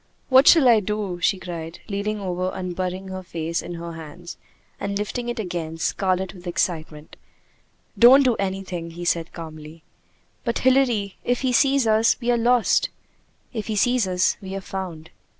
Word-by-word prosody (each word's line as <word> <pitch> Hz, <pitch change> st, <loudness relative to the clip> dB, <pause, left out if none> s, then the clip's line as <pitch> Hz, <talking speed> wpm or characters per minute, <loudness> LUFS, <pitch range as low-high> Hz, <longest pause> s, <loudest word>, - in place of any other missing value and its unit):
"What 265 Hz, +1 st, +6 dB
shall 315 Hz, -6 st, +7 dB
I 230 Hz, -3 st, +6 dB
do?" 205 Hz, -3 st, -3 dB
she 190 Hz, -, +2 dB
cried, 170 Hz, -2 st, -7 dB
leaning 210 Hz, +1 st, -2 dB
over 185 Hz, -1 st, -2 dB
and 180 Hz, -1 st, -4 dB
burying 185 Hz, +1 st, -3 dB
her 190 Hz, 0 st, -5 dB
face 170 Hz, -2 st, -3 dB
in 175 Hz, -, -7 dB
her 170 Hz, 0 st, -7 dB
hands, 165 Hz, +2 st, -9 dB, 0.4 s
and 200 Hz, 0 st, -2 dB
lifting 240 Hz, +4 st, -3 dB
it 240 Hz, -, -3 dB
again, 175 Hz, -6 st, -4 dB
scarlet 185 Hz, +2 st, -1 dB
with 180 Hz, -1 st, -12 dB
excitement. 160 Hz, -3 st, -3 dB, 0.8 s
"Don't 260 Hz, +4 st, +8 dB
do 250 Hz, -3 st, +3 dB
anything," 190 Hz, -3 st, -3 dB
he 175 Hz, +1 st, -8 dB
said 165 Hz, -1 st, 0 dB
calmly. 155 Hz, -1 st, -10 dB, 0.6 s
"But 235 Hz, -2 st, -1 dB
Hilary, 250 Hz, -7 st, +2 dB
if 245 Hz, 0 st, 0 dB
he 260 Hz, -2 st, 0 dB
sees 275 Hz, +1 st, +3 dB
us, 220 Hz, +1 st, +3 dB
we 245 Hz, -1 st, 0 dB
are 240 Hz, -, +2 dB
lost." 240 Hz, 0 st, +3 dB, 0.6 s
"If 220 Hz, -3 st, -4 dB
he 220 Hz, -, -2 dB
sees 245 Hz, 0 st, +2 dB
us, 180 Hz, 0 st, +1 dB
we 190 Hz, 0 st, -6 dB
are 195 Hz, -, -4 dB
found." 180 Hz, -5 st, -7 dB
190 Hz, 170 wpm, -23 LUFS, 175-230 Hz, 0.8 s, Don't